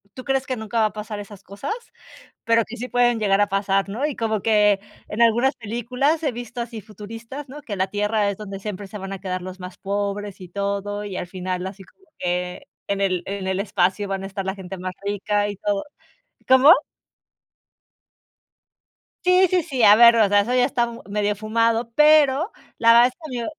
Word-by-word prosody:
tú 255 Hz, -, -8 dB
crees 270 Hz, 0 st, -1 dB
que 255 Hz, -, -1 dB
nunca 220 Hz, 0 st, -3 dB
va 220 Hz, -, +4 dB
a 215 Hz, -, -1 dB
pasar 210 Hz, 0 st, -6 dB
esas 205 Hz, -1 st, -10 dB
cosas, 200 Hz, -, -5 dB, 0.7 s
pero 230 Hz, 0 st, +3 dB
que 240 Hz, -, -8 dB
sí 250 Hz, +2 st, -5 dB
pueden 240 Hz, -1 st, +2 dB
llegar 205 Hz, -1 st, +2 dB
a 205 Hz, -, +3 dB
pasar, 195 Hz, 0 st, 0 dB
¿no? 235 Hz, +8 st, -2 dB
Y 300 Hz, -3 st, -2 dB
como 220 Hz, -3 st, -1 dB
que 210 Hz, -2 st, +4 dB, 0.3 s
en 220 Hz, +3 st, -3 dB
algunas 240 Hz, +4 st, +3 dB
películas 250 Hz, +8 st, -1 dB
he 290 Hz, -5 st, 0 dB
visto 240 Hz, 0 st, -6 dB
así 235 Hz, -2 st, -6 dB
futuristas, 225 Hz, +7 st, -9 dB
¿no?, 295 Hz, +2 st, -9 dB
que 205 Hz, -, -5 dB
la 190 Hz, 0 st, 0 dB
tierra 210 Hz, +1 st, 0 dB
es 200 Hz, -, -4 dB
donde 200 Hz, -2 st, -7 dB
siempre 205 Hz, -1 st, -6 dB
se 210 Hz, -, -8 dB
van 195 Hz, +1 st, -6 dB
a 195 Hz, -, -6 dB
quedar 185 Hz, -1 st, -4 dB
los 185 Hz, +1 st, -8 dB
más 180 Hz, 0 st, -9 dB
pobres 200 Hz, 0 st, -3 dB
y 180 Hz, -, -8 dB
todo. 200 Hz, +1 st, -3 dB
Y 195 Hz, -3 st, -6 dB
al -, -, -3 dB
final 185 Hz, 0 st, -4 dB
así 195 Hz, 0 st, -8 dB
como 385 Hz, -, -25 dB
que 180 Hz, 0 st, -3 dB, 0.2 s
en 200 Hz, 0 st, -1 dB
el 185 Hz, -2 st, 0 dB
en 195 Hz, -1 st, -4 dB
el 190 Hz, 0 st, -1 dB
espacio 195 Hz, 0 st, 0 dB
van 195 Hz, 0 st, -3 dB
a -, -, -4 dB
estar 195 Hz, 0 st, -5 dB
la 190 Hz, -, -1 dB
gente 190 Hz, -1 st, -8 dB
más 185 Hz, 0 st, -5 dB
rica 205 Hz, +1 st, 0 dB
y 205 Hz, -, -4 dB
todo 200 Hz, +3 st, -2 dB, 0.6 s
¿Cómo? 260 Hz, +5 st, +8 dB, 2.5 s
Sí, 365 Hz, +1 st, +5 dB
sí, 360 Hz, -3 st, +2 dB
sí. 265 Hz, -8 st, -2 dB
A 205 Hz, 0 st, +9 dB
ver, 235 Hz, 0 st, +8 dB
o 215 Hz, -3 st, +4 dB
sea, 205 Hz, 0 st, +5 dB
eso 240 Hz, +5 st, -2 dB
ya 250 Hz, 0 st, +4 dB
está 250 Hz, -2 st, +1 dB
m 235 Hz, 0 st, -9 dB
medio 205 Hz, 0 st, 0 dB
fumado, 230 Hz, +2 st, 0 dB
pero 300 Hz, -, +5 dB, 0.3 s
la 230 Hz, 0 st, +6 dB
verdad 240 Hz, +1 st, +7 dB
es 255 Hz, -, -8 dB, 0.2 s
que 250 Hz, -, -4 dB
yo 235 Hz, -, -3 dB
210 Hz, 210 wpm, -22 LUFS, 195-240 Hz, 2.5 s, A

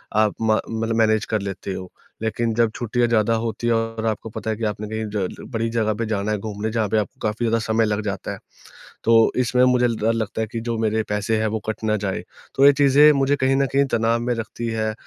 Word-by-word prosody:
आप 110 Hz, -1 st, +3 dB
मा 110 Hz, -1 st, +3 dB
मतलब 115 Hz, 0 st, -2 dB
मैनेज 110 Hz, -1 st, +2 dB
कर 110 Hz, -2 st, -1 dB
लेते 100 Hz, 0 st, -5 dB
हो, 95 Hz, -1 st, -7 dB, 0.3 s
लेकिन 115 Hz, +1 st, -1 dB
जब 115 Hz, -2 st, +2 dB
छुट्टियाँ 120 Hz, 0 st, 0 dB
ज्यादा 115 Hz, -1 st, +2 dB
होती 115 Hz, +1 st, -2 dB
हैं 115 Hz, -, +3 dB
और 115 Hz, 0 st, -2 dB
आपको 110 Hz, +1 st, -3 dB
पता 110 Hz, 0 st, -5 dB
है 110 Hz, -, 0 dB
कि 115 Hz, -, -6 dB
आपने 105 Hz, 0 st, -3 dB
कहीं 110 Hz, 0 st, -3 dB
ज 95 Hz, -3 st, -4 dB
बड़ी 115 Hz, 0 st, 0 dB
जगह 110 Hz, -2 st, 0 dB
पे 115 Hz, +2 st, -3 dB
जाना 105 Hz, -1 st, -1 dB
है 105 Hz, -, 0 dB
घूमने 105 Hz, +1 st, -4 dB
जहाँ 110 Hz, -2 st, 0 dB
पे 110 Hz, -, +1 dB
आपको 110 Hz, +5 st, -3 dB
काफ़ी 110 Hz, +3 st, -2 dB
ज्यादा 115 Hz, 0 st, +2 dB
समय 110 Hz, 0 st, +1 dB
लग 105 Hz, 0 st, -1 dB
जाता 100 Hz, -2 st, -4 dB
है। -, -, -6 dB, 0.7 s
तो 115 Hz, 0 st, +5 dB
इसमें 125 Hz, 0 st, +2 dB
मुझे 125 Hz, -1 st, +4 dB
डर 115 Hz, 0 st, 0 dB
लगता 110 Hz, 0 st, -2 dB
है 110 Hz, -, -1 dB
कि 115 Hz, -, -3 dB
जो 115 Hz, -1 st, -3 dB
मेरे 110 Hz, 0 st, 0 dB
पैसे 105 Hz, +2 st, 0 dB
हैं 110 Hz, -, +1 dB
वो 110 Hz, +1 st, -2 dB
कट 110 Hz, 0 st, -4 dB
ना 110 Hz, 0 st, +1 dB
जाए, 95 Hz, -2 st, -3 dB, 0.3 s
तो 135 Hz, -, +5 dB
ये 145 Hz, -, +9 dB
चीज़ें 145 Hz, +2 st, +6 dB
मुझे 140 Hz, +1 st, +2 dB
कहीं 130 Hz, 0 st, +1 dB
न 140 Hz, 0 st, +2 dB
कहीं 140 Hz, 0 st, +4 dB
तनाव 115 Hz, 0 st, +2 dB
में 120 Hz, +1 st, -1 dB
रखती 115 Hz, +1 st, -5 dB
है 110 Hz, -1 st, -1 dB
110 Hz, 245 wpm, -22 LUFS, 110-115 Hz, 0.7 s, ये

